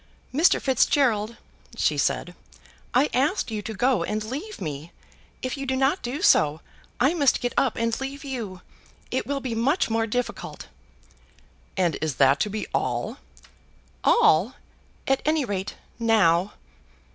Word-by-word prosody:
"Mr. 315 Hz, +7 st, +4 dB
Fitzgerald," 235 Hz, -4 st, +2 dB, 0.4 s
she -, -, +2 dB
said, -, -, -1 dB, 0.6 s
"I 265 Hz, +4 st, +3 dB
asked 280 Hz, -, +1 dB
you 215 Hz, -1 st, -3 dB
to 220 Hz, -, -6 dB
go 245 Hz, -4 st, +2 dB
and 210 Hz, +4 st, -2 dB
leave 295 Hz, -, -6 dB
me. 155 Hz, 0 st, -6 dB, 0.5 s
If 255 Hz, +2 st, -3 dB
you 275 Hz, 0 st, -5 dB
do 260 Hz, -, 0 dB
not 270 Hz, +7 st, +1 dB
do 250 Hz, +5 st, -4 dB
so, 150 Hz, +1 st, +4 dB, 0.4 s
I 265 Hz, +6 st, +3 dB
must 285 Hz, -7 st, +3 dB
get 245 Hz, -1 st, -2 dB
up 265 Hz, -4 st, +2 dB
and 230 Hz, +2 st, -1 dB
leave 275 Hz, +1 st, -5 dB
you. 225 Hz, -10 st, -5 dB, 0.5 s
It -, -, -1 dB
will 280 Hz, -1 st, -2 dB
be 255 Hz, -3 st, -3 dB
much 240 Hz, +4 st, +1 dB
more 225 Hz, 0 st, +1 dB
difficult." 245 Hz, +3 st, -4 dB, 1.1 s
"And 175 Hz, -4 st, +1 dB
is 155 Hz, -4 st, -1 dB
that 140 Hz, +1 st, +4 dB
to 210 Hz, -, 0 dB
be 215 Hz, +1 st, -3 dB
all?" -, -, -1 dB, 0.9 s
"All; 180 Hz, +11 st, +4 dB, 0.5 s
at 270 Hz, 0 st, +2 dB
any 310 Hz, -2 st, +1 dB
rate, 200 Hz, -3 st, -4 dB, 0.2 s
now." 205 Hz, -5 st, +3 dB
235 Hz, 145 wpm, -25 LUFS, 205-270 Hz, 1.1 s, Mr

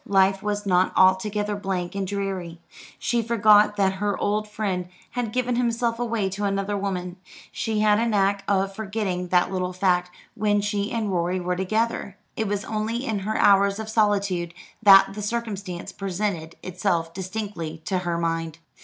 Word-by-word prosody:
Life 195 Hz, 0 st, +3 dB
was 210 Hz, 0 st, -2 dB
not 185 Hz, -1 st, +3 dB
altogether 205 Hz, +3 st, +3 dB
blank 190 Hz, -3 st, -3 dB
and 195 Hz, -1 st, -2 dB
dreary. 190 Hz, -4 st, -4 dB, 0.4 s
She 240 Hz, -1 st, 0 dB
forgot 215 Hz, -2 st, +4 dB
that 195 Hz, -2 st, +2 dB
her 205 Hz, -1 st, 0 dB
old 210 Hz, +1 st, 0 dB
friend 195 Hz, -4 st, -3 dB, 0.2 s
had 240 Hz, -3 st, -3 dB
given 250 Hz, 0 st, 0 dB
himself 235 Hz, -1 st, 0 dB
away 230 Hz, -4 st, 0 dB
to 200 Hz, +2 st, -4 dB
another 195 Hz, 0 st, -1 dB
woman. 185 Hz, -2 st, -3 dB, 0.3 s
She 220 Hz, -1 st, -1 dB
had 210 Hz, 0 st, +4 dB
a 235 Hz, -, +1 dB
knack 200 Hz, -2 st, +1 dB
of 195 Hz, -1 st, +1 dB
forgetting 195 Hz, -4 st, -3 dB
that 180 Hz, +1 st, +2 dB
little 185 Hz, -1 st, -2 dB
fact 180 Hz, -1 st, +1 dB, 0.2 s
when 210 Hz, -1 st, +1 dB
she 205 Hz, 0 st, -1 dB
and 220 Hz, -3 st, -1 dB
Rorie 180 Hz, +1 st, 0 dB
were 180 Hz, 0 st, -1 dB
together. 205 Hz, +1 st, -1 dB, 0.2 s
It 220 Hz, -, -1 dB
was 205 Hz, 0 st, -2 dB
only 225 Hz, +4 st, -2 dB
in 220 Hz, -5 st, -1 dB
her 215 Hz, +3 st, -2 dB
hours 200 Hz, 0 st, +4 dB
of 220 Hz, 0 st, -6 dB
solitude 200 Hz, -6 st, +1 dB, 0.3 s
that 195 Hz, -2 st, +7 dB
the 210 Hz, -, -6 dB
circumstance 205 Hz, -5 st, -4 dB
presented 185 Hz, -4 st, -3 dB
itself 175 Hz, -3 st, -1 dB
distinctly 185 Hz, -4 st, -5 dB
to 185 Hz, -2 st, 0 dB
her 175 Hz, -2 st, -2 dB
mind. 165 Hz, -1 st, -2 dB
200 Hz, 165 wpm, -24 LUFS, 185-215 Hz, 0.4 s, that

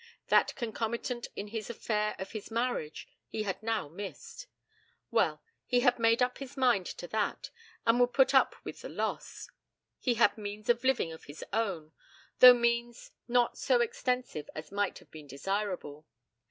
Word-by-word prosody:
That -, -, +4 dB
concomitant 235 Hz, 0 st, -3 dB
in 205 Hz, -, -5 dB
this 220 Hz, -2 st, -4 dB
affair 210 Hz, -2 st, -1 dB
of 190 Hz, -, -6 dB
his 215 Hz, -2 st, -7 dB
marriage, 230 Hz, -9 st, -2 dB, 0.2 s
he 215 Hz, -, -3 dB
had 195 Hz, -1 st, -3 dB
now 225 Hz, -7 st, -1 dB
missed. 205 Hz, -, -8 dB, 0.6 s
Well; -, -, +1 dB, 0.2 s
he 245 Hz, -1 st, +2 dB
had 245 Hz, -1 st, +3 dB
made 230 Hz, +2 st, +4 dB
up 250 Hz, 0 st, -1 dB
his 275 Hz, 0 st, -9 dB
mind 245 Hz, -9 st, +3 dB
to 175 Hz, -, -7 dB
that, 215 Hz, -1 st, -2 dB, 0.3 s
and 230 Hz, +1 st, +4 dB
would 245 Hz, 0 st, +4 dB
put 265 Hz, 0 st, +4 dB
up 265 Hz, -, +4 dB
with -, -, -8 dB
the -, -, -7 dB
loss. -, -, -4 dB, 0.5 s
He 245 Hz, -3 st, +1 dB
had 225 Hz, -2 st, +3 dB
means 210 Hz, +1 st, -6 dB
of 240 Hz, +1 st, +3 dB
living 260 Hz, -10 st, +2 dB
of 160 Hz, -, -12 dB
his 145 Hz, +2 st, -9 dB
own, 190 Hz, -9 st, -1 dB, 0.5 s
though 250 Hz, -1 st, +11 dB
means 235 Hz, 0 st, -1 dB, 0.2 s
not 240 Hz, 0 st, +2 dB
so -, -, +3 dB
extensive 255 Hz, -, -1 dB
as 155 Hz, 0 st, -7 dB
might 200 Hz, -1 st, -1 dB
have -, -, -18 dB
been 155 Hz, -2 st, -11 dB
desirable. 160 Hz, 0 st, -3 dB
225 Hz, 165 wpm, -31 LUFS, 200-245 Hz, 0.6 s, though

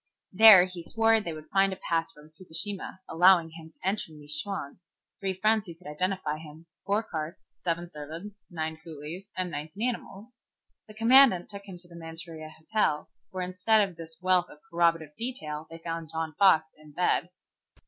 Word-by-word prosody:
There 200 Hz, -2 st, +10 dB
he 180 Hz, -2 st, -8 dB
swore 225 Hz, +5 st, +3 dB
they 175 Hz, -6 st, -4 dB
would 155 Hz, -1 st, -10 dB
find 195 Hz, 0 st, +4 dB
a -, -, -3 dB
pass 165 Hz, -1 st, -1 dB
from 150 Hz, -3 st, -17 dB
Fukushima 185 Hz, +3 st, -4 dB
allowing 175 Hz, -1 st, +5 dB
him 160 Hz, 0 st, -11 dB
to 170 Hz, -, -8 dB
enter 195 Hz, -4 st, -1 dB
New 150 Hz, -1 st, -13 dB
Chwang, 150 Hz, +1 st, -2 dB, 0.4 s
three 190 Hz, -1 st, -2 dB
friends 215 Hz, 0 st, +2 dB
who 170 Hz, -, -8 dB
could 180 Hz, -, -23 dB
identify 155 Hz, 0 st, -2 dB
him, 160 Hz, +1 st, -12 dB, 0.2 s
four 205 Hz, +3 st, +2 dB
carts, 160 Hz, -4 st, -6 dB
seven 170 Hz, 0 st, -3 dB
servants, 165 Hz, +8 st, -9 dB
nine 160 Hz, -3 st, -4 dB
coolies, 165 Hz, +5 st, -8 dB
and 185 Hz, -1 st, -2 dB
nineteen 160 Hz, +10 st, -3 dB
animals. 230 Hz, -1 st, -6 dB, 0.5 s
The 215 Hz, -, -13 dB
commandant 230 Hz, -5 st, +6 dB
took 200 Hz, -1 st, -9 dB
him 185 Hz, -2 st, -8 dB
to 175 Hz, 0 st, -15 dB
the 170 Hz, -, -14 dB
Manchuria 165 Hz, -1 st, -7 dB
Hotel, 160 Hz, 0 st, -1 dB, 0.2 s
where 185 Hz, -1 st, -4 dB
instead 200 Hz, +3 st, +3 dB
of 185 Hz, -, -13 dB
this 165 Hz, -1 st, -10 dB
wealth 185 Hz, -1 st, +2 dB
of -, -, -14 dB
corroborative 165 Hz, -3 st, +1 dB
detail 160 Hz, -11 st, -5 dB
they 165 Hz, -, -9 dB
found 165 Hz, -1 st, -5 dB
John 160 Hz, -1 st, -3 dB
Fox 170 Hz, -3 st, +5 dB
in 155 Hz, -1 st, -17 dB
bed. 180 Hz, +1 st, +1 dB
175 Hz, 180 wpm, -28 LUFS, 160-195 Hz, 0.5 s, There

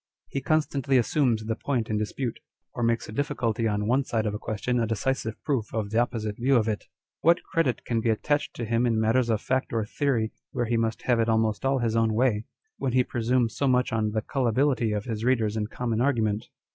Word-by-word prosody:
He 140 Hz, -, -3 dB
constantly 140 Hz, -2 st, +1 dB
assumes 120 Hz, -3 st, +2 dB
the 110 Hz, 0 st, -1 dB
point 120 Hz, -2 st, -1 dB
in 105 Hz, -1 st, -1 dB
dispute, 115 Hz, +3 st, -3 dB, 0.3 s
or -, -, -4 dB
makes 115 Hz, 0 st, +1 dB
a -, -, -8 dB
difficulty 115 Hz, -3 st, -1 dB
on 105 Hz, -1 st, 0 dB
one 130 Hz, +5 st, +2 dB
side 115 Hz, -3 st, -1 dB
of 105 Hz, -, -1 dB
a 105 Hz, -, -4 dB
question 120 Hz, +4 st, -1 dB
a 115 Hz, -, +1 dB
decisive 115 Hz, +1 st, -2 dB
proof 130 Hz, -8 st, -1 dB
of 105 Hz, -2 st, -2 dB
the 110 Hz, -, +2 dB
opposite 110 Hz, -3 st, -1 dB
view 135 Hz, +3 st, +2 dB
of 115 Hz, -3 st, +3 dB
it. 105 Hz, -2 st, -2 dB, 0.3 s
What 170 Hz, +2 st, +3 dB
credit 155 Hz, -7 st, 0 dB
can 115 Hz, -2 st, 0 dB
be 115 Hz, -, 0 dB
attached 145 Hz, +7 st, 0 dB
to 120 Hz, -, -3 dB
him 115 Hz, +2 st, +1 dB
in 115 Hz, -2 st, +1 dB
matters 115 Hz, +2 st, +2 dB
of 110 Hz, -2 st, +1 dB
fact 130 Hz, +1 st, -1 dB
or 115 Hz, -2 st, 0 dB
theory 115 Hz, -2 st, 0 dB, 0.2 s
where 120 Hz, -, 0 dB
he 115 Hz, +1 st, 0 dB
must 115 Hz, 0 st, -1 dB
have 120 Hz, -2 st, +2 dB
it 115 Hz, 0 st, +2 dB
almost 110 Hz, 0 st, +1 dB
all 135 Hz, 0 st, +3 dB
his 115 Hz, -3 st, 0 dB
own 115 Hz, -1 st, +2 dB
way, 115 Hz, -3 st, +2 dB, 0.3 s
when 130 Hz, -, -1 dB
he 130 Hz, 0 st, +4 dB
presumes 120 Hz, 0 st, 0 dB
so 140 Hz, -, +1 dB
much 125 Hz, -2 st, +2 dB
on 110 Hz, -1 st, +1 dB
the 110 Hz, +1 st, -1 dB
Gullibility 130 Hz, -1 st, +1 dB
of 105 Hz, -1 st, -2 dB
his 110 Hz, -2 st, -3 dB
readers 115 Hz, -4 st, +2 dB
in 105 Hz, -1 st, -1 dB
common 115 Hz, -1 st, -2 dB
argument 110 Hz, -6 st, +1 dB
115 Hz, 225 wpm, -26 LUFS, 110-130 Hz, 0.3 s, he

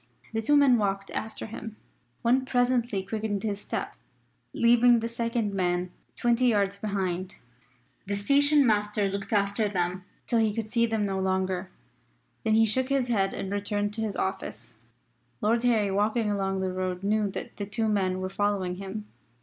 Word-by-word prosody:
The 225 Hz, -, 0 dB
two 290 Hz, +6 st, +4 dB
men 265 Hz, -4 st, +5 dB
walked 195 Hz, -1 st, -1 dB
after 220 Hz, -, -5 dB
him. 225 Hz, 0 st, -7 dB, 0.5 s
One 255 Hz, +3 st, +3 dB
presently 245 Hz, -5 st, +1 dB
quickened 210 Hz, 0 st, -3 dB
his 205 Hz, -2 st, -2 dB
step, -, -, -4 dB, 0.6 s
leaving 240 Hz, +1 st, +5 dB
the 230 Hz, 0 st, -1 dB
second 230 Hz, -2 st, -2 dB
man 180 Hz, -1 st, 0 dB, 0.3 s
twenty 240 Hz, +1 st, +2 dB
yards 200 Hz, -4 st, +2 dB
behind. 190 Hz, -3 st, -3 dB, 0.7 s
The 200 Hz, -, -1 dB
station 285 Hz, +7 st, +4 dB
master 210 Hz, -2 st, +2 dB
looked 195 Hz, 0 st, -4 dB
after 205 Hz, 0 st, +1 dB
them 180 Hz, -1 st, -1 dB, 0.2 s
till 235 Hz, -, +1 dB
he 215 Hz, -2 st, +1 dB
could 225 Hz, -2 st, -2 dB
see 235 Hz, +1 st, +1 dB
them 220 Hz, -2 st, 0 dB
no 195 Hz, -1 st, -1 dB
longer. 190 Hz, 0 st, -1 dB, 0.7 s
Then 220 Hz, -1 st, +2 dB
he 225 Hz, 0 st, +5 dB
shook 260 Hz, +5 st, 0 dB
his 270 Hz, -3 st, +1 dB
head 195 Hz, -4 st, +1 dB
and 195 Hz, -, -4 dB
returned 205 Hz, 0 st, -1 dB
to 225 Hz, -, -3 dB
his 215 Hz, -3 st, -2 dB
office. 120 Hz, -, -4 dB, 0.6 s
Lord 230 Hz, +2 st, +2 dB
Harry 225 Hz, -5 st, +2 dB
walking 210 Hz, +2 st, +1 dB
along 195 Hz, -1 st, -1 dB
the 185 Hz, -1 st, -1 dB
road 185 Hz, 0 st, -3 dB
knew 210 Hz, 0 st, +1 dB
that -, -, -7 dB
the 200 Hz, -, -4 dB
two 220 Hz, +2 st, -1 dB
men 190 Hz, -3 st, 0 dB
were 185 Hz, -, -2 dB
following 195 Hz, -3 st, -1 dB
him. 195 Hz, +2 st, -6 dB
205 Hz, 170 wpm, -27 LUFS, 195-230 Hz, 0.7 s, men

